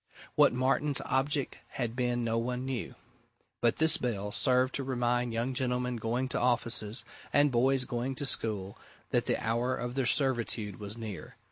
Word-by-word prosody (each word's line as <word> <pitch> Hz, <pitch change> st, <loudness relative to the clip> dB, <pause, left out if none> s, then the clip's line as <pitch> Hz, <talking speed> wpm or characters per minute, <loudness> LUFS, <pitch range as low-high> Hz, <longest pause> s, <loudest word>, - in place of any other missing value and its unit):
What -, -, +5 dB
Martin's 135 Hz, +3 st, +1 dB
object 135 Hz, +1 st, -1 dB
had 120 Hz, -3 st, -3 dB
been 120 Hz, -1 st, 0 dB
no 115 Hz, 0 st, 0 dB
one 125 Hz, +1 st, -2 dB
now 135 Hz, -, -2 dB
knew 120 Hz, -, -5 dB, 0.7 s
but 120 Hz, -1 st, +3 dB
this 160 Hz, -1 st, +4 dB
bell 105 Hz, -4 st, -2 dB
served 125 Hz, +3 st, +2 dB
to 140 Hz, -, -1 dB
remind 125 Hz, -2 st, 0 dB
young 115 Hz, +3 st, -1 dB
gentlemen 125 Hz, -1 st, -1 dB
going 120 Hz, +3 st, -1 dB
to -, -, -1 dB
offices, 120 Hz, -2 st, +2 dB, 0.3 s
and 145 Hz, 0 st, +4 dB
boys 130 Hz, +2 st, +3 dB
going 125 Hz, +2 st, -3 dB
to 145 Hz, -, -3 dB
school, 105 Hz, -6 st, -1 dB, 0.3 s
that -, -, +1 dB
the -, -, +2 dB
hour 120 Hz, +3 st, 0 dB
of 120 Hz, 0 st, -4 dB
their 130 Hz, -1 st, 0 dB
servitude 120 Hz, -7 st, +1 dB
was 105 Hz, +1 st, -6 dB
near. 105 Hz, -8 st, -7 dB
125 Hz, 170 wpm, -30 LUFS, 115-130 Hz, 0.7 s, What